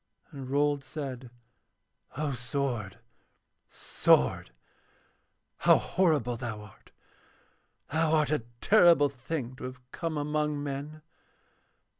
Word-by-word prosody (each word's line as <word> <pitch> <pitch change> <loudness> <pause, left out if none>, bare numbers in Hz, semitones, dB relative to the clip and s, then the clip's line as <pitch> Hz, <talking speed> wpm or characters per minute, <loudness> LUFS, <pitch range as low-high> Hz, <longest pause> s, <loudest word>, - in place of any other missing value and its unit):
And 135 -3 -8
Rold 145 0 +1
said: 135 -3 -6 0.9
'O 150 -1 -1
sword, 125 -5 -3 0.7
sword! 65 - +2 1.1
How - - +5
horrible 150 -10 +1
thou 115 -3 -5
art! 105 -1 -16 1.0
Thou 160 0 +3
art 150 -2 +2
a 150 - +2 0.2
terrible 170 -8 +6
thing 130 -1 -5
to - - -7
have 125 0 -10
come 165 -2 -3
among 150 0 -1
men. 145 +2 -6
140 Hz, 100 wpm, -29 LUFS, 125-150 Hz, 1.1 s, terrible